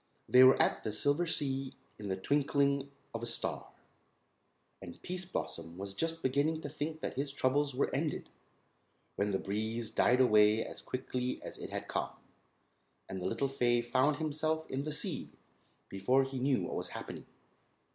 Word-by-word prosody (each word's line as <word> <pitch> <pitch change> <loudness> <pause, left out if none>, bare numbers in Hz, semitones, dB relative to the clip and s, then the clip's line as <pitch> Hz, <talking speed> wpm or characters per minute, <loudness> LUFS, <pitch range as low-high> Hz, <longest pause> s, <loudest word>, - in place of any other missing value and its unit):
They 125 +1 +8
were 130 +1 +7
at - - +2
the 110 - -2
Silver 145 +9 +1
Sea 135 -4 -1 0.2
in 105 - -5
the 95 - 0
twinkling 140 +3 +1 0.2
of 115 - -4
a 120 - -3
star, 115 - -1 1.1
and 90 -3 -9
Pease 185 +1 -4
Blossom 85 - -5
was 100 0 -5
just 165 +9 -2
beginning 145 +5 +1
to 145 - -5
think 155 +2 -4
that - - -3
his 140 +1 -1
troubles 140 0 +1
were 140 - 0
ended, 150 +2 -2 0.8
when 100 +1 0
the 95 - +1
breeze 110 +4 -2
died 125 +1 +4
away 110 -3 +5
as - - -7
quickly 125 -1 -3
as - - -8
it - - -6
had - - -4
come, - - -1 1.0
and 95 -1 -5
the 90 - -1
little 115 +7 0
fay 120 -3 +2
found 130 +5 +3
himself 155 +1 -1
in 135 +2 -2
the 155 - -2
sea 150 - -2 0.5
before 125 +8 +2
he 135 -1 -4
knew 130 0 +2
what - - -4
was - - -3
happening. - - -8
130 Hz, 170 wpm, -33 LUFS, 115-145 Hz, 1.1 s, They